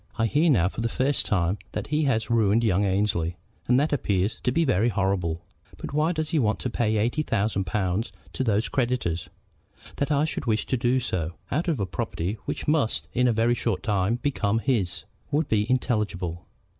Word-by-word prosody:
I 115 - +2
hear 150 +9 +3
now 90 - +4
for 105 - -4
the 115 - 0
first 135 +4 0
time 95 0 +1
that - - -3
he 150 0 +1
has 115 -4 0
ruined 115 0 +3
young 100 -3 +2
Annesley, 95 -4 0 0.3
and 125 +1 +4
that 150 +3 +2
does 145 - +1
appear 95 0 +1
to 125 - -2
be 165 +5 +2
very 115 -2 +2
horrible. 95 -5 -1 0.3
But - - -7
why 155 +3 +2
does 155 -2 -2
he 160 - +2
want 110 -4 +2
to 125 - -2
pay 110 -2 +1
eighty 120 +8 +1
thousand 105 -7 0
pounds 95 +3 -1 0.2
to - - -1
these 110 -2 +1
creditors? 95 - -1 0.7
That 140 - 0
I 145 +1 +3
should 155 - -4
wish 110 -2 +1
to - - 0
do 125 +1 +2
so, 90 -9 -2 0.2
out 155 +7 0
of 160 -8 0
a 100 - 0
property 95 +3 -3
which - - -4
must 150 -7 +1
in 125 +1 +3
a - - +4
very 115 +1 +2
short 115 -6 -1
time 105 0 +1
become 120 -5 0
his, 115 -7 0 0.3
would 150 +1 +1
be 105 0 +1
intelligible. 105 -9 -1
115 Hz, 205 wpm, -26 LUFS, 95-130 Hz, 0.7 s, now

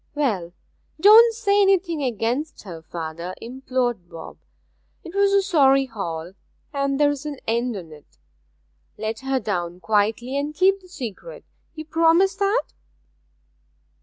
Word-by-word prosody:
'Well, 205 -13 -1 0.5
don't 440 +6 +8
say 410 -3 +2
anything 375 -5 +2
against 250 +4 -2
her, 170 -5 -9
father,' 170 +2 -6
implored 245 -6 -3
Bob. 165 -1 -10 0.7
''Twas 395 +3 +1
a 395 0 +3
sorry 275 -8 +4
haul, 175 -7 -6 0.4
and 275 0 -1
there's 290 -1 +2
an 290 -2 -5
end 235 +1 0
on't. 155 - -13 0.8
Let 220 +1 -4
her 270 0 -1
down 180 -5 -3
quietly, 220 +6 0
and 295 +2 -4
keep 385 +3 +3
the 370 - -18
secret. 270 - -8 0.3
You 310 0 -7
promise 330 +4 +3
that?' 405 +4 0
265 Hz, 125 wpm, -23 LUFS, 205-340 Hz, 0.8 s, don't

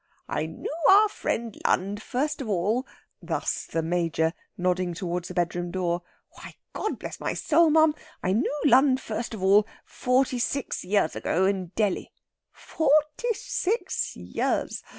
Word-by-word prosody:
"I 155 - -2
knoo 160 - -7 0.2
our 415 +2 +7
friend 230 - -3
Lund 200 +3 +1
first 275 +6 -2
of 240 - -5
all...." 210 +7 0 0.3
Thus - - -2
the 165 - -2
Major, 165 -1 0 0.2
nodding 180 -1 0
towards 175 -1 -3
the 180 - -8
bedroom 175 0 -1
door.... 175 -1 -1 0.3
"Why, - - -12 0.2
God 430 - -2
bless - - -7
my - - -2
soul, 325 +1 +4
ma'am, 315 0 +5 0.3
I 185 - +1
knew 280 +7 0
Lund 265 0 +5
first 230 -1 -4
of 190 - -7
all, 205 +2 +5 0.2
forty 250 0 +1
six 275 +3 -2
years 195 -2 +1
ago 185 +3 +1
in 190 -2 0
Delhi. 210 -4 0 0.4
Forty 305 - +1
six 460 +5 -2
years! - - -2
210 Hz, 150 wpm, -26 LUFS, 180-285 Hz, 0.4 s, our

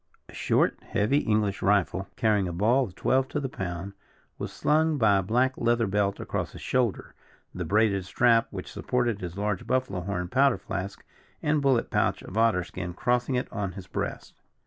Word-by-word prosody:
A - - -13
short, - - +1
heavy 110 +8 +1
English 105 -5 0
rifle, 95 -1 +1
carrying 105 -4 +2
a - - -3
ball 115 +9 +3
of 95 -5 -11
twelve 130 +5 +1
to 150 - -2
the 140 - -2
pound, 95 -3 -5 0.5
was - - -4
slung 155 0 +2
by 105 -5 +4
a - - +2
black 125 +7 +1
leather 120 0 +2
belt 100 0 0
across - - -3
his - - -10
shoulder, 125 -5 -1 0.4
the 90 - -4
braided 100 +1 +2
strap 115 +2 +3
which - - -7
supported 120 -4 -1
his 90 0 -6
large 105 -2 -2
buffalo 130 -7 0
horn 90 -1 -3
powder 135 +6 +3
flask 95 +2 -6 0.4
and 150 0 +2
bullet 135 -4 +2
pouch - - +1
of 95 - -10
otter 110 -5 +3
skin 90 0 -6
crossing 125 +4 0
it 125 - -1
on 100 -3 -3
his 95 -2 -9
breast. - - -5
105 Hz, 185 wpm, -27 LUFS, 95-125 Hz, 0.5 s, by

